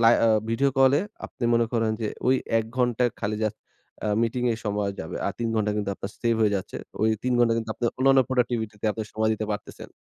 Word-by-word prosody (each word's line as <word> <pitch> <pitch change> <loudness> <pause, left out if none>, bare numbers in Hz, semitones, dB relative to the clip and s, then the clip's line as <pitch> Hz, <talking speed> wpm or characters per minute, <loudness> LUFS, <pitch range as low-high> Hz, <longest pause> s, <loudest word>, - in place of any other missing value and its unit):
লাই 115 +1 +7
আ - - +5 0.2
video 135 +5 +2
কলে 135 +2 +5 0.3
আপনি 120 - -6
মনে 115 0 +3
করেন 115 -2 +1
যে 110 - -1 0.2
ওই 130 - +5 0.2
1 110 - -1
ঘন্টায় 125 -1 +2
খালি 105 0 -1
জাস্ট 110 - -1 0.5
আ - - 0
মিটিংয়ে 120 0 +1
সময় 105 -1 0
যাবে। 80 - -5
আর 100 - -1
3 115 -1 -1
ঘন্টা 105 -1 +1
কিন্তু 105 -1 -1
আপনার 100 - -6
সেভ 115 -1 +2
হয়ে 105 -2 +3
যাচ্ছে। 95 - -6 0.3
ওই 110 - +4
৩ 125 - 0
ঘন্টা 120 -1 +4
কিন্তু 115 -1 -3
আপনার 120 -1 0
অন্যান্য 135 +1 +5
Productivity 120 -4 0
তে - - +1
আপনি 110 - -4
সময় 110 0 +1
দিতে 110 0 -4
পারতেছেন। 105 0 -7
115 Hz, 220 wpm, -25 LUFS, 110-125 Hz, 0.5 s, লাই